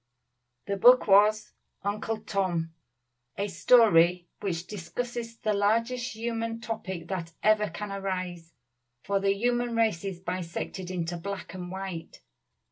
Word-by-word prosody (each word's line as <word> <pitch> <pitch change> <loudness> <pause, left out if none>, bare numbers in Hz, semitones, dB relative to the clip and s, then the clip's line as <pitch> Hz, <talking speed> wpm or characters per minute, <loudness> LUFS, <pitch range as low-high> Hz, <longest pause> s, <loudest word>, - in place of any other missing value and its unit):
The 200 - -2
book 250 +5 +7
was 210 +2 +5 0.3
"Uncle 215 +2 -2
Tom," 185 -6 -1 0.6
a 200 - -1
story 180 -6 +5
which 175 -4 -3
discusses 230 +4 -5
the 215 -1 0
largest 230 +5 +1
human 230 0 -3
topic 190 -7 -5
that 170 -4 -4
ever 215 -1 +4
can 210 -1 -6
arise; 185 -4 -4 0.5
for 200 0 +1
the 195 0 +2
human 240 +2 0
race 220 -7 +2
is 190 -3 -4
bisected 180 0 -4
into 175 -1 -3
black 200 +1 -6
and 180 -1 -6
white. 190 -3 -6
200 Hz, 125 wpm, -28 LUFS, 180-225 Hz, 0.6 s, book